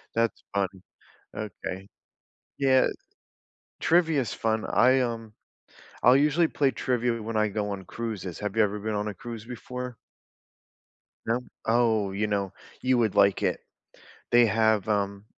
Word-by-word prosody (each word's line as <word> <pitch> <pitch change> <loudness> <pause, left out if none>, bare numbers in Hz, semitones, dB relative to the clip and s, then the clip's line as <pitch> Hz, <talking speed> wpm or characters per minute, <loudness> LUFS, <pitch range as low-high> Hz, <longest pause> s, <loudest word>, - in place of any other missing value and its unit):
That's 115 0 0
fun, 100 -1 +2 0.7
okay. 100 -2 -6 0.7
Yeah. 130 -2 +4 0.9
Trivia's 160 -7 +2
fun. 110 -1 -1
I, 130 +2 +4
um 115 -3 -3 0.7
I'll 125 +2 +7
usually 150 +4 +3
play 140 -3 +1
trivia 120 -2 -1
when 110 0 -3
I 110 0 +2
go 105 0 -2
on 95 -1 -5
cruises, 105 -5 -5
have 105 0 -4
you 110 - +5
ever 105 0 -1
been 110 0 -3
on 105 +1 -1
a - - -5
cruise 115 -1 -8
before? 125 0 -6 1.3
No? 115 +2 0 0.2
Oh, 110 -3 +2
you 105 +2 -1
know, 100 -2 -1 0.3
you 130 0 +2
would 110 -4 +1
like 100 -1 +4
it. - - +1 0.7
They 120 0 +7
have, 110 -2 +2
um 100 -1 -1
110 Hz, 140 wpm, -27 LUFS, 105-125 Hz, 1.3 s, I'll